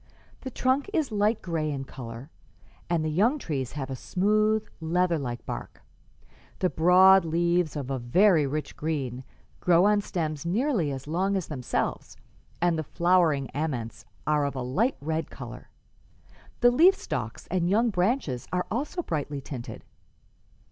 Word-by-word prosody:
The 265 - -6
trunk 260 - 0
is 315 - 0
light 210 +1 +1
gray 165 -3 -1
in 140 -2 -3
color, 125 +2 -9 0.6
and 165 -2 +1
the - - 0
young 220 - +3
trees 135 - -4
have 135 -2 -5
a - - -3
smooth, 215 - +1
leather 170 +1 +1
like 120 -3 -5
bark. - - -7 0.7
The 185 - 0
broad 185 +3 +6
leaves, 170 0 +1
of 140 -2 -4
a 135 - -1
very 160 - +4
rich 150 +2 -4
green, 135 -5 -3 0.4
grow 175 +1 +4
on 210 0 +4
stems 155 -7 -3
nearly 195 - 0
as 135 -1 -6
long 185 +6 0
as 185 - -4
themselves, 130 -5 -3 0.4
and 170 -2 +2
the - - -1
flowering 170 -4 +2
aments 125 -7 -3 0.2
are 150 -1 +2
of 140 -1 -2
a 130 - -3
light 200 - 0
red 160 +2 -2
color. - - -9 0.9
The 245 0 +6
leaf 345 +10 +6
stalks 115 - -5
and 175 -1 +1
young 225 +4 +3
branches 180 - 0
are 180 0 0
also 295 - -2
brightly 145 - -3
tinted. 130 -3 -8
165 Hz, 155 wpm, -27 LUFS, 140-200 Hz, 0.9 s, broad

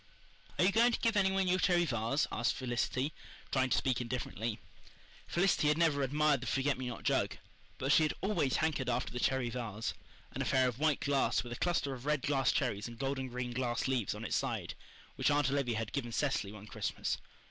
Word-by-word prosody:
"Are - - +4
you 195 - +4
going 235 +3 +5
to - - 0
give 230 -1 +1
any 195 -2 +4
one 190 -1 +1
your 180 +1 +2
cherry 175 -1 +3
vase?" 120 +1 0
asked 115 - 0
Felicity, 130 +3 -1 0.4
trying 130 -1 +2
to - - +2
speak 130 -2 +1
indifferently. 115 -2 -3 0.7
Felicity 175 -3 +2
had 150 +1 +3
never 160 -4 +3
admired 145 0 +2
the 130 - -5
forget 135 +3 +1
me 130 -1 -5
not 120 -3 -6
jug, - - +1 0.4
but 135 +2 0
she 160 - +6
had 155 - +2
always 175 - +1
hankered 150 -5 0
after 120 0 -1
the 125 - -3
cherry 120 +2 +1
vase 115 -3 -3 0.4
an - - -4
affair 130 -1 +3
of 125 0 -3
white 155 -2 +2
glass, 140 -1 +2
with 120 -1 -6
a - - -8
cluster 170 -6 0
of 130 +2 -8
red 150 -3 +1
glass 135 -3 +2
cherries 115 -6 -1
and 120 -1 -10
golden 135 0 -2
green 125 0 -4
glass 120 -1 -1
leaves 125 -7 0
on - - -6
its - - -1
side, - - -2 0.4
which - - +2
Aunt 145 -1 +2
Olivia 130 -5 0
had 110 -1 -4
given 120 -4 -2
Cecily 130 -6 0
one 105 -1 -10
Christmas. - - -3
130 Hz, 215 wpm, -33 LUFS, 120-150 Hz, 0.7 s, she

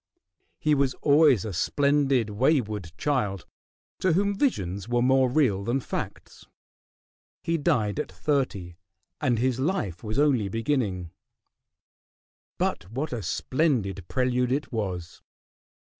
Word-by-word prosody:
He 155 - +1
was 135 -2 +1
always 145 - +5
a 105 - -4
splendid, 140 - +2
wayward 105 - 0
child, 105 - -1 0.5
to 185 -3 +2
whom 200 +4 +2
visions 100 - -1
were 120 0 +2
more 130 0 +4
real 120 -8 +2
than 120 +6 0
facts. - - -6 1.0
He 165 0 0
died 105 -8 +1
at - - -3
thirty, 95 - -2 0.4
and 130 -5 +2
his 125 +1 0
life 130 - -2
was 110 0 -3
only 135 -9 +3
beginning. 110 - -1 1.5
But 85 - -2
what 135 +6 -3
a 120 - -3
splendid 100 - -1
prelude 125 -1 0
it 140 +3 -1
was! 95 -7 -4
125 Hz, 120 wpm, -26 LUFS, 100-145 Hz, 1.5 s, always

